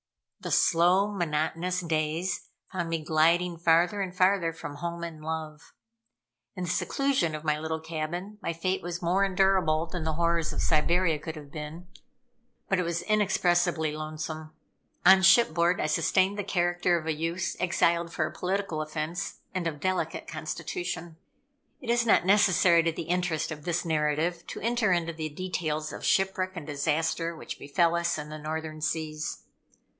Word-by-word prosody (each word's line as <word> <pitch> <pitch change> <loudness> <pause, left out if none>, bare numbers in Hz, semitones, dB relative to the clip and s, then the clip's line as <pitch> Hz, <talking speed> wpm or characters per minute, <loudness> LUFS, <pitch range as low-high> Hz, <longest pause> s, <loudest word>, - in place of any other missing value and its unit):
The - - -6
slow, 180 +4 +4
monotonous 175 0 -1
days 165 +2 -1 0.2
found 175 -3 -3
me 165 -1 -2
gliding 170 +3 +3
farther 170 +4 +3
and 180 -2 -4
farther 185 -2 +3
from 145 -3 -8
home 170 +2 -4
and 165 -2 -7
love. 155 -1 -6 0.8
In 185 - -4
the 175 - -3
seclusion 270 - 0
of 155 - -7
my 150 -1 +1
little 160 0 -3
cabin, 165 +6 -5
my - - -2
fate 185 +3 -1
was 175 0 -5
more 180 +4 +2
endurable 185 -4 +2
than 170 0 -5
the 160 0 -1
horrors 170 0 +1
of - - -2
Siberia 165 +1 +2
could 160 +2 -6
have 145 -2 -11
been, 155 +3 -7 0.8
but 195 - +1
it - - +1
was 170 0 -2
inexpressibly 175 -6 +2
lonesome. 155 0 -6 0.5
On 190 +1 +8
shipboard 180 -4 +5
I - - 0
sustained 185 +6 +2
the - - -1
character 175 -2 +1
of 160 - -6
a 160 - 0
youth, 165 +4 -2
exiled 170 -1 +1
for 155 - 0
a - - -5
political 185 -4 -2
offense, 155 +4 -4
and 180 -2 -1
of 160 - -2
a - - -14
delicate 185 +5 -2
constitution. 175 - -5 0.6
It 250 -5 -2
is 235 0 +2
not 205 - +4
necessary 185 -3 +5
to 165 0 +1
the 160 - -5
interest 170 -2 -1
of 150 -2 -7
this 175 +1 -1
narrative 160 +2 0
to - - -6
enter 230 -2 +1
into 170 -1 +1
the 155 -1 -4
details 155 -2 -3
of - - -8
shipwreck 190 -1 +1
and 170 -4 -6
disaster, 160 +3 -1
which - - -8
befel 165 +4 +2
us 170 -1 0
in 150 0 -6
the 155 0 -7
Northern 155 0 -5
Seas. 155 -1 -3
170 Hz, 170 wpm, -28 LUFS, 155-180 Hz, 0.8 s, On